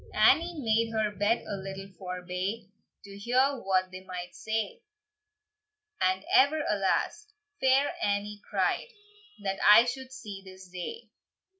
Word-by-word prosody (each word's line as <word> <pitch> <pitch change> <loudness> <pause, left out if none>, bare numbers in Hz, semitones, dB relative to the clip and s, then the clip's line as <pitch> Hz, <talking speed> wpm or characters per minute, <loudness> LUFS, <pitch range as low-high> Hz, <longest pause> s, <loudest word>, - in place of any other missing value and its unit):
Annie 320 +11 +4
made 225 -2 +1
her 215 -1 +1
bed 205 +4 +1
a - - -3
little 195 0 -7
forbye, 185 +3 -5 0.4
To 200 0 -11
hear 255 +4 +2
what 185 -1 +1
they 185 0 -9
might 180 -1 -7
say; 220 - -3 1.2
"And 185 +1 +1
ever 295 +3 +5
alas!" 210 - 0 0.3
Fair 265 +2 +3
Annie 205 0 -1
cried, - - 0 0.6
"That 195 -1 -2
I 210 +3 +8
should 260 +1 -5
see 210 -7 -8
this 190 -1 -12
day! 185 - -7
205 Hz, 130 wpm, -29 LUFS, 190-250 Hz, 1.2 s, I